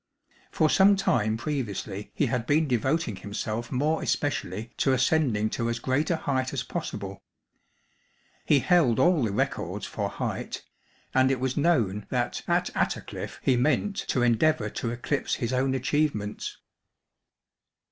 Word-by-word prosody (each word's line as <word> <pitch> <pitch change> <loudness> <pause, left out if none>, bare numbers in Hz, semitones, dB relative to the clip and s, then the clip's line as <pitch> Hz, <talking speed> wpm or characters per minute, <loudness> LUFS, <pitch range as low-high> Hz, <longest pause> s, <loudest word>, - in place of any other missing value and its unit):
For 155 - +2
some 195 +5 +5
time 110 - +1
previously 110 -7 -4
he 145 - +2
had 125 -2 -1
been 155 +2 +3
devoting 130 - 0
himself 110 +3 -4
more 150 +5 +1
especially 115 -5 -2
to 135 - +2
ascending 125 -6 +2
to 115 0 -1
as 115 - -1
great 130 +6 0
a 170 - +3
height 130 -4 -1
as - - -1
possible. - - -5 1.2
He 140 - +4
held 160 -11 +3
all 175 -3 +4
the 110 - 0
records 100 - -2
for - - -3
height, - - -4 0.5
and 130 0 +4
it 135 -2 0
was 130 0 -1
known 115 - +1
that - - -1
at - - +1
Attercliffe - - -3
he 130 - +3
meant 155 +11 +1
to 125 - +1
endeavour 150 +7 +2
to 115 - -3
eclipse 125 +4 -1
his 120 +1 -2
own 130 +1 +1
achievements. 130 -6 -1
130 Hz, 145 wpm, -27 LUFS, 115-150 Hz, 1.2 s, some